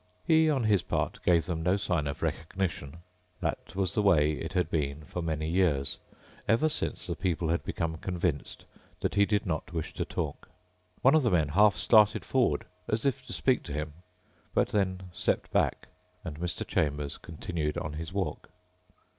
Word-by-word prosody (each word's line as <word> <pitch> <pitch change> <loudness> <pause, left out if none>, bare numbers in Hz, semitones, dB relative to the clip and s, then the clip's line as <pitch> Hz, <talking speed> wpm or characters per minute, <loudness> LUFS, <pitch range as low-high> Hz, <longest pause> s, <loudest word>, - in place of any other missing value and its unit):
He, 160 0 +5
on 135 -5 +1
his 105 -4 +3
part, - - -2
gave 85 -2 +4
them 85 -3 -2
no 90 +4 +2
sign 90 -6 0
of 70 - -4
recognition. 80 -2 -3 0.4
That - - -3
was 95 -4 0
the - - +2
way 80 -7 +4
it 80 +3 -4
had 90 -3 +2
been 75 -1 -1
for 90 +4 -5
many 80 -2 -2
years, 80 -6 +1 0.5
ever 115 +9 +3
since - - -3
the - - -3
people 85 -3 -1
had 85 -3 +1
become 80 +1 -2
convinced 85 -3 -2 0.4
that - - 0
he 100 0 +4
did 105 -2 +1
not 85 -1 -3
wish 80 -2 -3
to - - -2
talk. 75 -4 -4 0.5
One 135 - +7
of 155 - +6
the 120 - +2
men 80 -7 +2
half 100 +4 +5
started 105 +6 +4
forward 130 -2 +1 0.2
as 110 +3 -1
if 135 -1 +1
to - - -7
speak 130 0 +2
to - - -5
him, 75 0 -3 0.6
but - - +3
then 95 -3 0
stepped - - -1
back - - +1 0.3
and 80 -4 -6
Mr. 90 0 -2
Chambers 75 -2 -1
continued 80 -2 -3
on 75 - -3
his 80 +2 -5
walk. 95 0 -3
85 Hz, 180 wpm, -29 LUFS, 80-100 Hz, 0.6 s, One